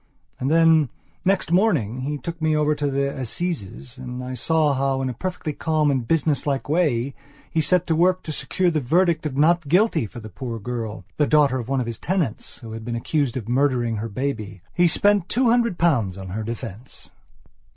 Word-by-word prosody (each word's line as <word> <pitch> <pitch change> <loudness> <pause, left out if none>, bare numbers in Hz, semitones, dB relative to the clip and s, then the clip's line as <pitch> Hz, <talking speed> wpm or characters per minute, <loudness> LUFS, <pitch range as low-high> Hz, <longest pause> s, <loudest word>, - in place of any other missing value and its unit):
And 130 - -1
then, 160 -3 +5 0.3
next 190 -3 +1
morning, 160 - +2
he 145 +3 -2
took 170 +2 -7
me 155 -1 +2
over 150 0 +2
to 145 -1 -1
the 140 0 -1
Assizes 130 - -4
and 125 0 -6
I 130 0 -5
saw 150 +4 +2
how, 135 0 0
in 130 - -1
a - - -3
perfectly 180 +2 -4
calm 155 -1 +1
and 130 -4 -1
business 150 -4 +1
like 140 -2 -1
way, 140 -5 +1 0.4
he 160 - +2
set 180 +3 +2
to 165 - +1
work 180 +3 +3
to 155 - -5
secure 180 +4 0
a 160 -2 0
verdict 165 +4 +2
of 135 -3 -6
not 165 +1 +3
guilty 175 - +3
for - - -12
a - - -6
poor 120 +1 -6
girl, 110 -3 -5
the 150 - +3
daughter 145 -4 +4
of 120 +1 -6
one 135 -1 +1
of - - -2
his 115 -1 -5
tenants, 175 - -2
who 115 -2 -9
had 110 0 -7
been 120 +1 -3
accused 135 +1 -1
of 115 -4 -5
murdering 125 -3 +1
her 115 +2 -4
baby. 110 -5 -4
He 175 0 +4
spent 200 +2 +2
two 245 0 +3
hundred 235 -6 +2
pounds 120 - +1
on 95 -1 -7
her 105 +5 -3
defence... 115 +1 -7
140 Hz, 205 wpm, -23 LUFS, 120-165 Hz, 0.4 s, then